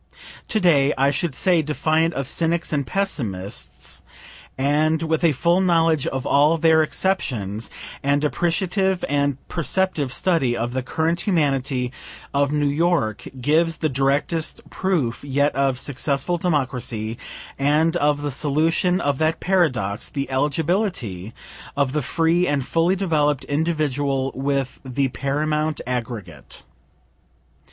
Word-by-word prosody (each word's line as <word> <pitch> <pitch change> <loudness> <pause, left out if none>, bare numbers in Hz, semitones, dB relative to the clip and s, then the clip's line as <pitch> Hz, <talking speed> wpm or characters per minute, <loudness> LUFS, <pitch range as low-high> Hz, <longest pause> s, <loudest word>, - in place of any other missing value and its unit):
To 215 - +1
day, 150 -7 +3
I 135 +1 +3
should 145 0 -1
say 180 -4 +3
defiant 155 +2 0
of 135 -1 -2
cynics 165 +2 0
and 140 -3 -1
pessimists, 110 - -3 0.6
and 155 +4 +2
with 160 +1 0
a 165 - +5
full 170 +6 +2
knowledge 165 -5 +2
of 130 -1 -3
all 150 +4 +4
their 160 0 +4
exceptions 115 - -1 0.3
an 145 +1 +1
appreciative 180 +4 0
and 140 -1 +1
perceptive 170 -4 0
study 135 -3 +1
of 120 +1 -2
the 130 - -1
current 160 +6 -1
humanity 135 -8 0 0.4
of 140 0 +2
New 150 -1 +1
York 145 - 0
gives 160 +5 +2
the 155 - 0
directest 140 +4 -1
proof 155 -13 -1
yet 145 +1 +1
of 135 -2 +1
successful 140 +5 -1
Democracy, 125 -8 -1 0.4
and 150 +4 +2
of 145 -2 +1
the 145 - -1
solution 160 +6 +1
of 145 -5 -1
that 160 0 +1
paradox, 130 - +1
the 140 -1 -4
eligibility 140 - -1 0.5
of 140 -2 +2
the 150 - 0
free 165 +5 +1
and 140 -3 0
fully 170 +5 +2
developed 150 -7 +1
individual 145 -3 0
with 135 -1 -2
the 135 +1 -1
paramount 150 +3 -1
aggregate. 115 - -6
145 Hz, 130 wpm, -22 LUFS, 135-165 Hz, 0.6 s, a